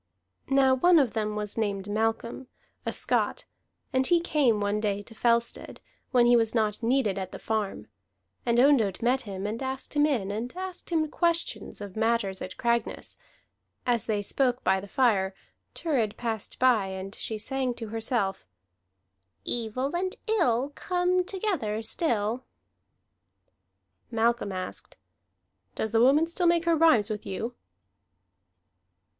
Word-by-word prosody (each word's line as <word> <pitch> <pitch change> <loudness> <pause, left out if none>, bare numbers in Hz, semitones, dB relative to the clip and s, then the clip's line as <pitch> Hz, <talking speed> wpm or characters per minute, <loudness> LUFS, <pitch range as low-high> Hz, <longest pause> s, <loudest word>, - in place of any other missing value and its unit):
Now 270 -1 +5
one 345 +7 +5
of 270 -7 +3
them 215 -1 -1
was 210 +1 -3
named 200 -2 -1
Malcolm, 225 +4 -2 0.4
a - - +1
Scot, - - 0 0.5
and 260 0 +3
he 345 -1 +4
came 280 -10 +2
one 205 +1 0
day 205 -1 -1
to 225 - -12
Fellstead, 235 +1 0 0.3
when 245 -2 +4
he 240 0 +6
was 225 0 +2
not 215 -1 +1
needed 230 -5 +1
at 190 -1 -5
the - - -7
farm. 210 - -2 0.6
And 235 0 +1
Ondott 240 -8 +3
met 255 +2 +2
him, 195 -3 -6
and 220 +4 -3
asked 265 0 -4
him 295 0 +4
in, 220 -10 -1
and 225 +4 -4
asked 370 -1 -6
him 320 -3 +1
questions 340 - -1
of 200 -2 -7
matters 220 -4 0
at 185 - -7
Cragness. 235 -1 -1 0.7
As 240 -4 +1
they 210 -2 0
spoke 250 +3 0
by 190 0 +3
the 200 - -9
fire, 200 -5 +2 0.4
Thurid 250 -11 0
passed 225 -4 -3
by, 245 -6 +3
and 190 +1 -6
she 220 - -4
sang 255 +2 -2
to 225 -2 -6
herself: 220 - -2 1.0
"Evil 245 +6 -1
and 370 +1 -1
ill 290 - +1
Come 360 +3 +1
together 355 - -2
still." 230 - 0 1.7
Malcolm 230 -2 +1
asked: 185 -1 -6 0.8
"Does 220 - -2
the 225 0 +3
woman 280 +6 +5
still 345 +1 0
make 340 0 +3
her 335 -1 +4
rhymes 245 -10 +4
with 210 -1 -4
you?" 220 +5 -4
235 Hz, 145 wpm, -27 LUFS, 210-275 Hz, 1.7 s, he